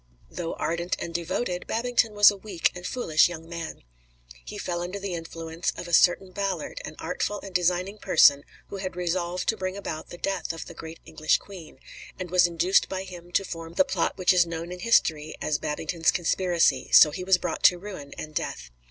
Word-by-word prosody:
Though 170 Hz, -2 st, -4 dB
ardent 170 Hz, +2 st, -2 dB
and 170 Hz, -, -6 dB
devoted, 175 Hz, +2 st, -2 dB
Babington 235 Hz, -1 st, +1 dB
was 205 Hz, 0 st, +8 dB
a -, -, -6 dB
weak 195 Hz, -4 st, -1 dB
and 180 Hz, 0 st, -6 dB
foolish 160 Hz, -11 st, +3 dB
young 165 Hz, -2 st, -8 dB
man. 170 Hz, -, -7 dB, 0.6 s
He -, -, -8 dB
fell 175 Hz, -1 st, -3 dB
under 180 Hz, +3 st, -4 dB
the 200 Hz, -2 st, -4 dB
influence 165 Hz, 0 st, -4 dB
of 175 Hz, -, -6 dB
a 175 Hz, -, -7 dB
certain 185 Hz, +3 st, +4 dB
Ballard, 195 Hz, -4 st, -3 dB
an -, -, -8 dB
artful 200 Hz, +4 st, -3 dB
and 195 Hz, -2 st, -10 dB
designing 180 Hz, +3 st, 0 dB
person 145 Hz, -6 st, +5 dB, 0.3 s
who 200 Hz, -, -6 dB
had 185 Hz, -2 st, -5 dB
resolved 180 Hz, 0 st, -2 dB
to 220 Hz, -, +1 dB
bring 185 Hz, +1 st, -3 dB
about 160 Hz, -5 st, -6 dB
the 175 Hz, -, -9 dB
death 195 Hz, -2 st, -2 dB
of 165 Hz, -, -7 dB
the -, -, -10 dB
great 160 Hz, 0 st, -9 dB
English 155 Hz, -1 st, +1 dB
Queen, 185 Hz, -5 st, -12 dB, 0.4 s
and 180 Hz, -2 st, -6 dB
was 180 Hz, -1 st, +5 dB
induced 175 Hz, +3 st, +2 dB
by 190 Hz, 0 st, -3 dB
him 175 Hz, -2 st, -11 dB
to 195 Hz, -, +2 dB
form 165 Hz, -2 st, -7 dB
the 285 Hz, -, +4 dB
plot -, -, -1 dB
which 185 Hz, -1 st, +4 dB
is 175 Hz, -2 st, +4 dB
known 170 Hz, +1 st, -5 dB
in 180 Hz, -, -7 dB
history 160 Hz, -8 st, +2 dB
as 150 Hz, 0 st, -1 dB
Babington's 160 Hz, +2 st, -1 dB
Conspiracy; 175 Hz, 0 st, +1 dB
so 150 Hz, -, +8 dB
he 180 Hz, -, -5 dB
was 185 Hz, 0 st, +4 dB
brought 175 Hz, -2 st, -4 dB
to 180 Hz, -, +7 dB
ruin 175 Hz, -7 st, -9 dB
and 155 Hz, 0 st, -7 dB
death. 60 Hz, -, -4 dB
175 Hz, 205 wpm, -26 LUFS, 165-190 Hz, 0.6 s, was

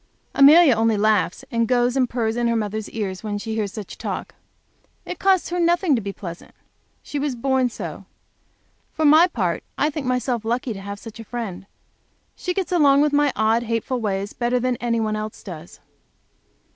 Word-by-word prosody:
Amelia 290 Hz, +1 st, +7 dB
only 225 Hz, -1 st, +2 dB
laughs, 205 Hz, -5 st, +1 dB
and 230 Hz, -1 st, +1 dB
goes 245 Hz, +1 st, +2 dB
and 255 Hz, -3 st, +2 dB
purrs 225 Hz, -2 st, -1 dB
in 240 Hz, 0 st, 0 dB
her 235 Hz, -, +1 dB
mother's 215 Hz, -1 st, -3 dB
ears 195 Hz, -4 st, -4 dB
when 210 Hz, -1 st, -3 dB
she 220 Hz, +2 st, -5 dB
hears 215 Hz, -3 st, -2 dB
such 210 Hz, -2 st, -8 dB
talk. -, -, -5 dB, 0.7 s
It -, -, -6 dB
costs 380 Hz, -2 st, +2 dB
her 355 Hz, -, -1 dB
nothing 340 Hz, -1 st, +2 dB
to 230 Hz, -, -1 dB
be 200 Hz, -1 st, -4 dB
pleasant. 175 Hz, -3 st, -9 dB, 0.5 s
She 290 Hz, -, -4 dB
was 280 Hz, -2 st, -1 dB
born 260 Hz, +1 st, +1 dB
so. -, -, -7 dB, 0.9 s
For 315 Hz, -, 0 dB
my 310 Hz, +4 st, +7 dB
part, 185 Hz, -, -2 dB
I 300 Hz, +2 st, +1 dB
think 285 Hz, -3 st, -4 dB
myself 250 Hz, -2 st, -1 dB
lucky 235 Hz, +1 st, -1 dB
to 195 Hz, -, -8 dB
have 200 Hz, +1 st, -6 dB
such 225 Hz, +2 st, -11 dB
a -, -, -6 dB
friend. 215 Hz, -5 st, -6 dB, 0.7 s
She 360 Hz, -, -3 dB
gets 380 Hz, -2 st, -2 dB
along 285 Hz, -5 st, +5 dB
with 295 Hz, -1 st, +2 dB
my 290 Hz, -1 st, +3 dB
odd, 220 Hz, +2 st, +2 dB
hateful 235 Hz, +2 st, -2 dB
ways 200 Hz, -1 st, -2 dB
better 245 Hz, +1 st, 0 dB
than 250 Hz, 0 st, 0 dB
any 235 Hz, -1 st, -1 dB
one 215 Hz, -1 st, -1 dB
else 215 Hz, 0 st, -6 dB
does. 175 Hz, -3 st, -10 dB
235 Hz, 190 wpm, -22 LUFS, 215-275 Hz, 0.9 s, Amelia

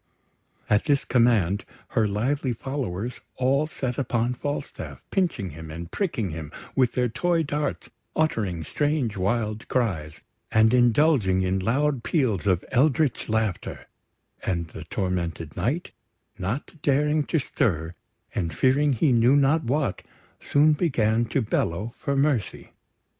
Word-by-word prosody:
At 105 Hz, -1 st, +2 dB
this 145 Hz, -3 st, +2 dB
command, 110 Hz, -6 st, +3 dB, 0.3 s
her 110 Hz, -2 st, +2 dB
lively 125 Hz, +6 st, 0 dB
followers 120 Hz, -3 st, -4 dB
all 135 Hz, +4 st, +2 dB
set 130 Hz, -5 st, -3 dB
upon 120 Hz, -2 st, 0 dB
Falstaff, 145 Hz, +3 st, -5 dB
pinching 170 Hz, -, 0 dB
him, 80 Hz, +1 st, -9 dB
and 85 Hz, +2 st, -7 dB
pricking 120 Hz, -, -1 dB
him 80 Hz, -1 st, -6 dB, 0.2 s
with 130 Hz, -3 st, +3 dB
their 125 Hz, -1 st, +1 dB
toy 170 Hz, +8 st, +1 dB
darts, 145 Hz, -1 st, -3 dB, 0.2 s
uttering 105 Hz, -, 0 dB
strange 145 Hz, -, 0 dB
wild 110 Hz, +3 st, -1 dB
cries, 90 Hz, -, -1 dB, 0.3 s
and 110 Hz, +1 st, +4 dB
indulging 120 Hz, -6 st, +4 dB
in 95 Hz, +1 st, +1 dB
loud 135 Hz, +6 st, +1 dB
peals 120 Hz, -, 0 dB
of 90 Hz, -2 st, +2 dB
eldritch 140 Hz, 0 st, +2 dB
laughter; 110 Hz, -4 st, -2 dB, 0.6 s
and 85 Hz, -3 st, -2 dB
the 80 Hz, -, -9 dB
tormented 85 Hz, -4 st, -3 dB
Knight, 150 Hz, +9 st, -1 dB, 0.4 s
not 120 Hz, -, -4 dB
daring 150 Hz, +2 st, +2 dB
to 165 Hz, -, 0 dB
stir, 90 Hz, -, 0 dB, 0.4 s
and 85 Hz, -7 st, -2 dB
fearing 140 Hz, +2 st, +3 dB
he 130 Hz, +4 st, +2 dB
knew 120 Hz, +3 st, +5 dB
not 145 Hz, +3 st, +3 dB
what, 130 Hz, -6 st, 0 dB, 0.4 s
soon 150 Hz, +2 st, +4 dB
began 120 Hz, -8 st, +1 dB
to 130 Hz, +2 st, 0 dB
bellow 105 Hz, +2 st, -1 dB
for 140 Hz, -, -2 dB
mercy. 135 Hz, -5 st, 0 dB
120 Hz, 130 wpm, -25 LUFS, 95-145 Hz, 0.6 s, knew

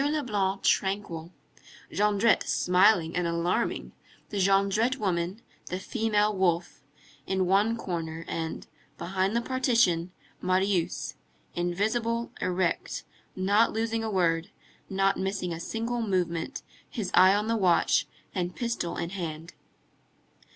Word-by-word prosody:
Leblanc 215 Hz, -10 st, 0 dB
tranquil, 190 Hz, -4 st, 0 dB, 0.6 s
Jondrette 210 Hz, +2 st, +3 dB
smiling 180 Hz, -2 st, +3 dB
and 180 Hz, -1 st, 0 dB
alarming, 170 Hz, +7 st, -1 dB, 0.4 s
the 205 Hz, -, -3 dB
Jondrette 200 Hz, +5 st, +3 dB
woman, 185 Hz, 0 st, -2 dB, 0.2 s
the 185 Hz, -, -3 dB
female 210 Hz, -1 st, +1 dB
wolf, 175 Hz, -2 st, 0 dB, 0.5 s
in 190 Hz, -1 st, +1 dB
one 205 Hz, +5 st, +3 dB
corner, 165 Hz, -5 st, -4 dB
and, 160 Hz, -1 st, -4 dB, 0.3 s
behind 190 Hz, +3 st, -1 dB
the 235 Hz, -, +1 dB
partition, 230 Hz, -10 st, +2 dB, 0.3 s
Marius, 185 Hz, -1 st, 0 dB, 0.4 s
invisible, 220 Hz, +7 st, -1 dB
erect, 180 Hz, -1 st, -1 dB, 0.3 s
not 200 Hz, +4 st, +3 dB
losing 225 Hz, 0 st, -1 dB
a 220 Hz, -, -2 dB
word, 170 Hz, -4 st, +1 dB, 0.4 s
not 195 Hz, 0 st, +2 dB
missing 190 Hz, -2 st, -2 dB
a 165 Hz, -, -5 dB
single 230 Hz, +6 st, -2 dB
movement, 185 Hz, -, -1 dB, 0.3 s
his 215 Hz, -6 st, -4 dB
eye 185 Hz, +2 st, +7 dB
on 210 Hz, +1 st, 0 dB
the 230 Hz, -, +1 dB
watch, 175 Hz, -6 st, +3 dB, 0.3 s
and 180 Hz, -1 st, -2 dB
pistol 235 Hz, -8 st, -2 dB
in 170 Hz, -, -3 dB
hand. 165 Hz, -3 st, -5 dB
190 Hz, 115 wpm, -28 LUFS, 175-220 Hz, 0.6 s, eye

